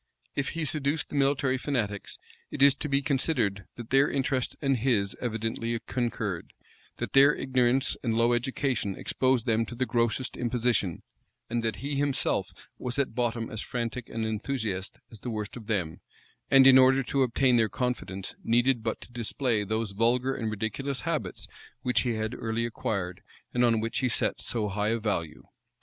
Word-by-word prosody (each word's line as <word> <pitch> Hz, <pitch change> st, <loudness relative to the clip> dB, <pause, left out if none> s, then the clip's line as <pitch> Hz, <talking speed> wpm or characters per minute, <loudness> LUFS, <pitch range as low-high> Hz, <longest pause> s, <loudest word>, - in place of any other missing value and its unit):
If 140 Hz, -, 0 dB
he 165 Hz, -, 0 dB
seduced 145 Hz, +1 st, -1 dB
the -, -, -6 dB
military 135 Hz, -2 st, +2 dB
fanatics, 115 Hz, -8 st, -2 dB, 0.3 s
it 135 Hz, -, +1 dB
is 140 Hz, -1 st, +8 dB
to 150 Hz, -, -3 dB
be 140 Hz, 0 st, +2 dB
considered, 130 Hz, -, 0 dB
that 120 Hz, -1 st, -9 dB
their 135 Hz, +1 st, +5 dB
interests 130 Hz, -2 st, 0 dB
and 135 Hz, -3 st, +1 dB
his 110 Hz, -5 st, +1 dB
evidently 115 Hz, 0 st, -2 dB
concurred; 115 Hz, -7 st, -3 dB, 0.4 s
that -, -, -4 dB
their 140 Hz, +2 st, +7 dB
ignorance 130 Hz, 0 st, +2 dB
and 115 Hz, -2 st, 0 dB
low 115 Hz, +1 st, +3 dB
education 120 Hz, -4 st, -1 dB
exposed 130 Hz, -2 st, +1 dB
them 115 Hz, -2 st, +2 dB
to 120 Hz, -, -7 dB
the 130 Hz, -, 0 dB
grossest 120 Hz, +1 st, 0 dB
imposition; 120 Hz, -7 st, 0 dB, 0.5 s
and 120 Hz, 0 st, 0 dB
that 115 Hz, -1 st, 0 dB
he 140 Hz, -1 st, -2 dB
himself 140 Hz, -1 st, 0 dB, 0.3 s
was 125 Hz, +1 st, -3 dB
at 140 Hz, -4 st, 0 dB
bottom 115 Hz, -1 st, -1 dB
as 110 Hz, -, -3 dB
frantic 120 Hz, 0 st, -4 dB
an 115 Hz, -, -3 dB
enthusiast 110 Hz, -3 st, -3 dB
as 110 Hz, -, -11 dB
the 125 Hz, -, -5 dB
worst 105 Hz, -2 st, -4 dB
of 115 Hz, -4 st, -10 dB
them; 90 Hz, -7 st, -2 dB, 0.5 s
and, 135 Hz, -1 st, +7 dB
in 130 Hz, -1 st, +9 dB
order 130 Hz, +1 st, +5 dB
to 135 Hz, +2 st, 0 dB
obtain 130 Hz, 0 st, +3 dB
their 110 Hz, -2 st, +3 dB
confidence, 110 Hz, -7 st, -3 dB
needed 120 Hz, +1 st, +3 dB
but 110 Hz, 0 st, -3 dB
to -, -, -12 dB
display 120 Hz, -1 st, -1 dB
those 110 Hz, +1 st, -2 dB
vulgar 120 Hz, +5 st, +1 dB
and 115 Hz, -4 st, -3 dB
ridiculous 110 Hz, +6 st, -3 dB
habits -, -, -3 dB, 0.4 s
which 125 Hz, -2 st, +2 dB
he 120 Hz, -3 st, -1 dB
had 110 Hz, +1 st, -2 dB
early 115 Hz, -1 st, -2 dB
acquired, 100 Hz, -5 st, -3 dB, 0.3 s
and 125 Hz, -, +2 dB
on 115 Hz, -2 st, +4 dB
which 115 Hz, +2 st, -1 dB
he 130 Hz, -, +1 dB
set -, -, 0 dB
so 110 Hz, -3 st, 0 dB
high 105 Hz, +1 st, -1 dB
a 115 Hz, -, +1 dB
value. 90 Hz, -8 st, -3 dB
120 Hz, 175 wpm, -28 LUFS, 110-130 Hz, 0.5 s, in